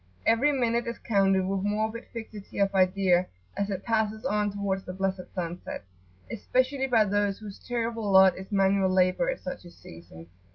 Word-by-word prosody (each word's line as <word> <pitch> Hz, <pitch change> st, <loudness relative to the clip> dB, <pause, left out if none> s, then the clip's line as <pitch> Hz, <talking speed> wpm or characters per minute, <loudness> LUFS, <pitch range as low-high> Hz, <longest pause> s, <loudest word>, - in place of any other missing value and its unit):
Every 255 Hz, +6 st, +4 dB
minute 240 Hz, -3 st, 0 dB
is 235 Hz, -, -4 dB
counted 195 Hz, -3 st, +2 dB
with 195 Hz, 0 st, -1 dB
morbid 215 Hz, +3 st, -2 dB
fixity 220 Hz, -3 st, -9 dB
of 200 Hz, 0 st, +2 dB
idea 185 Hz, -1 st, +3 dB, 0.3 s
as 200 Hz, 0 st, -2 dB
it 195 Hz, -1 st, -4 dB
passes 220 Hz, -1 st, -1 dB
on 210 Hz, 0 st, +1 dB
towards 195 Hz, -1 st, -2 dB
the 180 Hz, -, -7 dB
blessed 190 Hz, 0 st, -3 dB
sunset, 175 Hz, -, -5 dB, 0.5 s
especially 260 Hz, +4 st, 0 dB
by 230 Hz, -4 st, +4 dB
those 205 Hz, 0 st, 0 dB
whose 210 Hz, -3 st, -10 dB
terrible 230 Hz, -3 st, -3 dB
lot 190 Hz, -1 st, +7 dB
is 190 Hz, +3 st, -10 dB
manual 195 Hz, -1 st, +3 dB
labour 185 Hz, -, +2 dB
at -, -, -3 dB
such 270 Hz, -6 st, -6 dB
a 175 Hz, -, -12 dB
season. 85 Hz, -, -13 dB
200 Hz, 170 wpm, -27 LUFS, 190-225 Hz, 0.5 s, lot